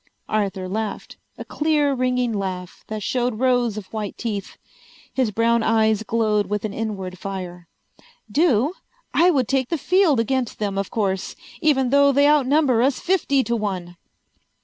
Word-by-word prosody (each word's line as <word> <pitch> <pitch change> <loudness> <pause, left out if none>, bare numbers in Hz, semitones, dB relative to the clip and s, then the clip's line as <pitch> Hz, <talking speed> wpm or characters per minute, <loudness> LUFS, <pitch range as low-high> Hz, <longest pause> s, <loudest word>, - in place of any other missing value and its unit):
Arthur 195 -3 -1
laughed, 215 +2 -4 0.2
a - - -7
clear 295 -2 +1
ringing 250 -2 0
laugh 185 -3 -5
that 215 -1 -5
showed 245 -1 -1
rows 245 -3 +1
of 210 - -6
white 210 -2 -4
teeth. 205 -4 -4 0.6
His 255 -4 +1
brown 230 +2 +2
eyes 220 -1 +2
glowed 215 -2 0
with 210 +1 -2
an 210 - -4
inward 195 -5 -4
fire. 180 -3 -6 0.6
"Do? 285 - +2 0.4
I 345 +2 +5
would 265 -9 +2
take 265 -2 0
the 330 - 0
field 345 -3 +3
against 245 +1 -1
them, 200 -2 -2
of 195 - -3
course! 195 -4 -2 0.3
Even 265 -5 +2
though 280 0 +5
they 285 +1 +4
outnumber 285 -4 +3
us 265 +2 +2
fifty 335 -7 +1
to 235 - -1
one." 185 -5 -4
230 Hz, 155 wpm, -22 LUFS, 205-270 Hz, 0.6 s, I